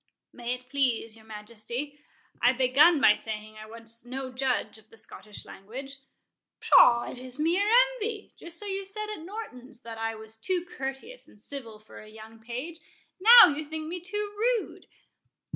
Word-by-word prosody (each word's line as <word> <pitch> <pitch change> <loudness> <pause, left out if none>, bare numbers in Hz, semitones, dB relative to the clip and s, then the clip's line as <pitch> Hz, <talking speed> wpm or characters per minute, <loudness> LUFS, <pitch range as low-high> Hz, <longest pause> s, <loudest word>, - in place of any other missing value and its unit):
"May 245 0 -3
it 250 0 -15
please 250 -5 0
your 220 -1 -15
Majesty,—I 235 +5 -4
begun 270 +6 +5
by 210 - +7
saying 215 0 -7
I 215 0 -10
was 230 +1 -8
no 260 +1 -6
judge 255 -3 -1
of 215 0 -24
the 225 - -18
Scottish 210 -1 -11
language." 265 +8 -9 0.6
"Pshaw—it 240 +1 +5
is 255 0 -9
mere 350 +7 +1 0.2
envy; 435 -3 -5
just 340 0 -10
so 415 - -9
you 390 -1 -3
said 425 +2 -6
at 420 - -7
Norton's, 300 - -9
that 230 -2 -9
I 225 0 -2
was 220 0 -12
too 350 +10 -2
courteous 350 - -7
and 210 - -19
civil 230 -2 -8
for 215 0 -14
a 215 - -14
young 220 +1 -13
page—now 335 - +4
you 310 - -4
think 310 +1 -6
me 355 +2 -4
too 410 +3 -4
rude." 460 +1 -1
260 Hz, 160 wpm, -28 LUFS, 225-345 Hz, 0.6 s, by